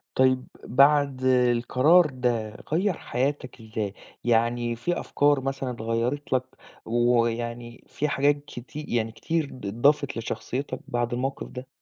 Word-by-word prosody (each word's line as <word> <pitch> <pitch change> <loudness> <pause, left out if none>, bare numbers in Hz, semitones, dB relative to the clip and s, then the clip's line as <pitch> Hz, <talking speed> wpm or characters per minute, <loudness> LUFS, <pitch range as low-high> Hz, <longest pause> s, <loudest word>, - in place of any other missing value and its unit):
طيب، 130 -1 +3 0.2
بعد 140 0 +3
القرار 125 +6 +4
ده 120 -4 -1 0.2
غيّر 190 +4 +2
حياتك 130 -1 -3
إزاي، 110 -2 -4 0.3
يعني 120 0 +1
في 175 +10 -2
أفكار 145 -1 +2
مثلًا 135 -1 -3
غيّرت 115 +6 -1
لك 130 - +2 0.4
ويعني 120 0 0
في 150 0 -2
حاجات 145 +1 +1
كتي 125 +3 -8
يعني 115 -1 0
كتير 165 +6 -1
ض 125 -6 -7
ضافت 140 -1 +3
لشخصيّتك 125 +4 -4
بعد 120 0 -1
الموقِف 135 +3 -2
ده؟ 125 0 -8
125 Hz, 125 wpm, -26 LUFS, 120-140 Hz, 0.4 s, القرار